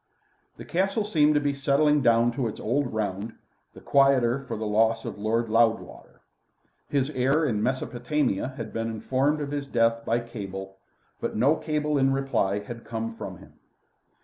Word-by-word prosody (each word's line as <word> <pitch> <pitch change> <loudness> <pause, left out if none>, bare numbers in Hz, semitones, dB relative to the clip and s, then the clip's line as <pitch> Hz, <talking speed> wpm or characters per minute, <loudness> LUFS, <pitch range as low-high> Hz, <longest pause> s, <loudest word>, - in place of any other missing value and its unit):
The - - -9
Castle 195 +4 0
seemed 150 -7 +3
to - - +5
be 145 -1 0
settling 145 +2 +2
down 120 -1 +4
to 120 0 -2
its 110 - -6
old 125 +4 0
round, 105 0 -3 0.4
the - - -12
quieter 135 -2 +3
for 115 - -4
the 110 - -4
loss 110 +2 +2
of - - -6
Lord 115 +2 0
Loudwater. 115 0 0 0.7
His 140 0 0
heir 135 +4 +2
in 110 -7 0
Mesopotamia 130 -1 -1
had 115 -3 -6
been 115 0 -2
informed 130 +7 0
of 145 -1 -4
his 145 -1 -3
death 115 -2 +1
by 115 +1 +1
cable. 95 -4 -7 0.4
But - - -3
no 135 +8 +4
cable 150 -2 -1
in 135 0 +3
reply 135 -8 0
had 115 +3 -9
come 115 0 -4
from - - -7
him. - - -16
120 Hz, 170 wpm, -26 LUFS, 115-140 Hz, 0.7 s, to